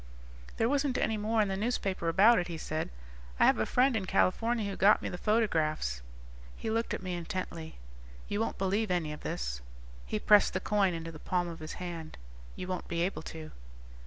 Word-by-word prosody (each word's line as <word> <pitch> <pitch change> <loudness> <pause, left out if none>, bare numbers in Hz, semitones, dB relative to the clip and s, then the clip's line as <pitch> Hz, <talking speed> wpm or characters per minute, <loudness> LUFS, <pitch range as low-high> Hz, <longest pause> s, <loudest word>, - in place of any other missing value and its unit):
"There 225 - +2
wasn't 275 0 +1
any 220 - +1
more 215 +1 +1
in - - -1
the 195 - -1
newspapers 195 -5 -1
about 200 +7 +6
it," 175 - -2
he 170 -2 -5
said. 155 0 -3 0.5
"I - - +6
have - - +4
a - - +1
friend 255 0 +3
in 195 -4 -1
California 220 +4 +2
who 200 - -3
got 205 +2 +5
me - - -2
the 180 - -5
photographs." 160 - +1 0.6
_He 220 - -2
looked 230 +1 0
at - - -8
me 185 -1 -3
intently. 170 -2 -5 0.5
"You 205 - -2
won't 225 - -1
believe 200 +3 0
any 170 -4 0
of 150 - -9
this." - - -3 0.5
He - - -1
pressed 210 - +5
the 185 - 0
coin 195 -2 +1
into 165 0 -5
the 155 - -10
palm 180 +1 -1
of 170 -1 -7
his 155 0 -6
hand. 170 -3 -6 0.4
"You - - -5
won't 185 -1 -3
be 170 0 0
able 185 -2 -2
to." 160 -1 -8
185 Hz, 205 wpm, -31 LUFS, 165-215 Hz, 0.6 s, about